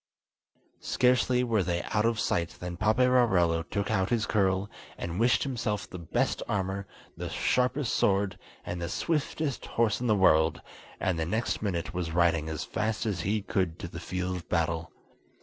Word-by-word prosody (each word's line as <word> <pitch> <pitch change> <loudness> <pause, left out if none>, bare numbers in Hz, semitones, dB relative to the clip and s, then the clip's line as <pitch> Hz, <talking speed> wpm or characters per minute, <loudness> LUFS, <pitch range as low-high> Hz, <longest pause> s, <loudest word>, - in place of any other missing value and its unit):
Scarcely 125 0 +2
were 115 -4 +2
they 85 -1 -1
out 105 0 0
of 115 -1 0
sight 85 -6 -1
than 90 0 -5
Paperarello 110 -5 +3
took 100 +1 -1
out 95 -3 +1
his 115 -2 +1
curl, 95 -1 +1 0.3
and 85 +2 -4
wished 120 +2 +3
himself 110 -6 -2
the 90 - -8
best 85 - -1
armour, 95 -1 -2 0.3
the - - -5
sharpest 125 +1 +1
sword, 100 -1 +1 0.3
and 85 0 -4
the 85 - -3
swiftest 150 - -1
horse 115 0 +1
in 125 - 0
the 110 - +4
world, 80 -5 +4 0.4
and 90 -3 0
the 80 - 0
next 110 +6 -1
minute 90 -5 -2
was 90 -2 -2
riding 85 -2 +2
as 80 - -3
fast 110 0 -2
as 100 -6 -1
he 105 +3 0
could 95 -6 -1
to - - -6
the 85 0 -8
field 90 +1 -3
of 90 - -11
battle. 80 -2 0
95 Hz, 170 wpm, -29 LUFS, 85-115 Hz, 0.4 s, the